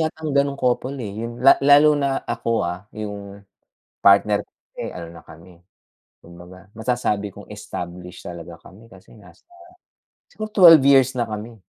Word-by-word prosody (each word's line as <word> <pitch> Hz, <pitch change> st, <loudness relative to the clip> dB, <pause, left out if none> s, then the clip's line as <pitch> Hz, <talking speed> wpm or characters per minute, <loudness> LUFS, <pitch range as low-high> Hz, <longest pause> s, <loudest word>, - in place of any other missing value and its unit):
yatang 155 Hz, -2 st, -3 dB
gano'ng 140 Hz, 0 st, +1 dB
couple, 125 Hz, +2 st, -1 dB
eh,' 105 Hz, -4 st, -6 dB
yung 120 Hz, +1 st, -8 dB
la 135 Hz, -, +6 dB
lalo 145 Hz, +1 st, +6 dB
na 140 Hz, -2 st, -1 dB
ako, -, -, -4 dB, 0.2 s
ah, 90 Hz, +3 st, -6 dB
'yung 100 Hz, -1 st, -8 dB, 0.6 s
partner 100 Hz, +1 st, +4 dB
ko, -, -, -29 dB, 0.3 s
eh, -, -, -5 dB
ano 85 Hz, -2 st, -9 dB
na 85 Hz, -, -13 dB
kami, 85 Hz, +2 st, -17 dB, 0.6 s
kumbaga, 90 Hz, +2 st, -15 dB
masasabi 110 Hz, -3 st, -2 dB
kong -, -, -14 dB
established 90 Hz, +1 st, -9 dB
talaga 85 Hz, -1 st, -9 dB
kami, 110 Hz, +5 st, -17 dB
kasi 95 Hz, -3 st, -18 dB
nasa 100 Hz, -, -19 dB, 0.9 s
siguro 215 Hz, 0 st, -7 dB
12 165 Hz, -8 st, +7 dB
years 135 Hz, -1 st, +4 dB
na 120 Hz, -2 st, -1 dB
kami. 110 Hz, -1 st, -8 dB
105 Hz, 155 wpm, -21 LUFS, 90-135 Hz, 0.9 s, 12